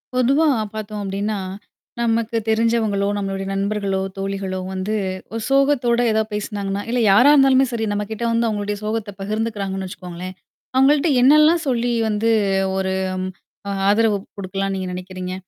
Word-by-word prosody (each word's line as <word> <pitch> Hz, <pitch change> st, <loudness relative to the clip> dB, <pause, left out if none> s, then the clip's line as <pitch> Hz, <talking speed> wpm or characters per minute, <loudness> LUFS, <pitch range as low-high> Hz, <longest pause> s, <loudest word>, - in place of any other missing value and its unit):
பொதுவா 275 Hz, +6 st, +3 dB, 0.3 s
பார்த்தோம் 215 Hz, -1 st, -5 dB
அப்படீன்னா 200 Hz, +2 st, -2 dB, 0.6 s
நமக்குத் 230 Hz, -1 st, 0 dB
தெரிஞ்சவங்களோ, 220 Hz, -3 st, +1 dB
நம்மளோட 195 Hz, -1 st, -3 dB
நண்பர்களோ, 195 Hz, 0 st, -1 dB, 0.2 s
தோழிகளோ 195 Hz, -1 st, -3 dB
வந்து 190 Hz, +3 st, -3 dB, 0.4 s
ஒரு 230 Hz, -, -3 dB
சோகத்தோட 270 Hz, -3 st, +3 dB
எதாவது 220 Hz, 0 st, 0 dB
பேசினாங்கன்னா 205 Hz, -1 st, -3 dB
இல்ல 245 Hz, +1 st, 0 dB
யாரா 245 Hz, +9 st, +7 dB
இருந்தாலுமே 270 Hz, -2 st, +5 dB
சரி, 225 Hz, -2 st, -1 dB
நம்ம 205 Hz, 0 st, -1 dB
கிட்ட 220 Hz, +2 st, -4 dB
வந்து 230 Hz, 0 st, +1 dB
அவங்களுடைய 205 Hz, -1 st, -2 dB
சோகத்தைப் 210 Hz, -2 st, -4 dB
பகிர்ந்துக்குறாங்கன்னு 200 Hz, -2 st, -3 dB
வச்சுக்கோங்களேன். 180 Hz, -1 st, -8 dB, 0.4 s
அவங்கள்ட்ட 280 Hz, +4 st, +4 dB
என்னல்லாம் 305 Hz, +5 st, +5 dB
சொல்லி 245 Hz, -2 st, +1 dB, 0.2 s
வந்து 215 Hz, +2 st, 0 dB, 0.5 s
ஒரு 190 Hz, 0 st, -1 dB, 0.8 s
ஆ -, -, -1 dB, 0.2 s
ஆதரவு 210 Hz, 0 st, +3 dB, 0.2 s
குடுக்கலாம்ன்னு 195 Hz, 0 st, -3 dB
நீங்க 185 Hz, -, -4 dB
நெனைக்கிறீங்க? 185 Hz, 0 st, -6 dB
210 Hz, 130 wpm, -21 LUFS, 195-235 Hz, 0.8 s, யாரா